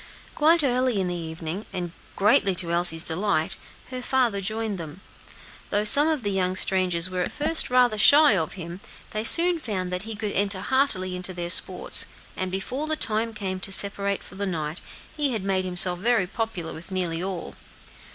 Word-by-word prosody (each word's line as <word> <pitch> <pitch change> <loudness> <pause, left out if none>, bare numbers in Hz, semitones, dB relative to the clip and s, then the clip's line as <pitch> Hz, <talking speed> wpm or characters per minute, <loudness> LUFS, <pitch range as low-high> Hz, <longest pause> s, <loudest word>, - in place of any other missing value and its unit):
Quite 320 +1 +3
early 255 -4 0
in 185 -2 -2
the - - -3
evening, 165 +3 -6
and 175 -2 -5 0.2
greatly 195 -1 +2
to 170 -1 -3
Elsie's 170 -1 +5
delight, 165 -1 +1 0.3
her 255 0 -5
father 245 -6 0
joined 215 0 -3
them; 160 -2 -6 0.7
and, - - -26
though 205 +1 0
some 280 +8 +6
of 310 -6 -1
the 205 - -1
young 185 -1 -1
strangers 185 -3 +2
were 185 -1 -4
at - - -2
first 310 +1 -1
rather 250 -4 +2
shy 290 0 +7
of 160 -4 -2
him, 175 -1 -8 0.3
they 215 0 -3
soon 340 +7 +5
found 185 - -4
that 180 - -2
he 220 +1 -7
could 210 -1 -4
enter 200 -1 -1
heartily 195 -8 0
into 180 0 -5
their 175 -1 -3
sports, - - +2 0.3
and 185 - -4
before 255 +10 -4
the 310 - 0
time 225 -5 -2
came 190 -3 -4
to 195 - -4
separate 200 0 0
for - - -14
the 200 +1 -4
night, 160 -2 -4 0.3
he 290 -4 0
had 215 -4 -3
made 190 -1 -1
himself 180 0 +3
very 225 -1 +1
popular 185 -4 -5
with 165 +4 -11
nearly 175 -3 -3
all. 185 -2 -5
195 Hz, 190 wpm, -24 LUFS, 180-230 Hz, 0.7 s, shy